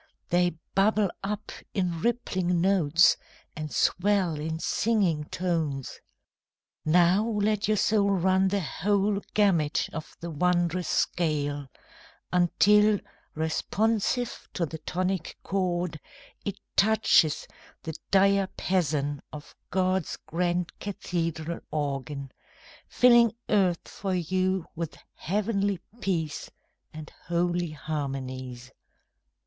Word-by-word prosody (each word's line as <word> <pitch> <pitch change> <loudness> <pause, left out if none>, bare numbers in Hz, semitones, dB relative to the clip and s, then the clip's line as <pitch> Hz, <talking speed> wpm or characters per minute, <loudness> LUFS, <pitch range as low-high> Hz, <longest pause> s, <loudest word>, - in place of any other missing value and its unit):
They 175 -1 +2 0.2
bubble 205 0 +3
up 210 +1 -4 0.2
in 175 -4 -1
rippling 185 -7 0
notes, 175 -3 +4 0.4
and 155 -1 -5
swell 185 -4 +2
in 160 +1 -3
singing 185 -5 +1
tones. 160 -7 -2 0.8
Now 175 +5 +4
let 210 -1 +1
your 215 0 +2
soul 200 0 +3
run 190 0 +3
the 200 +1 0
whole 200 +5 0
gamut 175 -8 +2
of 160 -1 -7
the 170 0 -6
wondrous 175 +2 +1
scale 145 -4 0 0.7
Until, 205 +4 +4 0.4
responsive 215 +9 -1
to 175 - +1
the 160 0 -7
tonic 180 +1 -2
chord, 180 -4 -1 0.5
It 200 - -2 0.2
touches 205 -7 +4 0.4
the 160 - -4 0.2
diapason 185 -7 +1
of 150 -1 -10 0.2
God's 185 -2 0
grand 175 +1 -1
cathedral 170 -4 -3
organ, 140 -2 -3 0.6
Filling 235 -2 +5
earth 185 -5 +2
for 190 -2 -3
you 185 +1 0
with 165 -1 -5 0.2
heavenly 200 0 -1 0.2
peace 160 -7 -2 0.4
And 155 -1 -9 0.2
holy 175 0 0
harmonies. 130 -4 -5
180 Hz, 100 wpm, -27 LUFS, 160-200 Hz, 0.8 s, Filling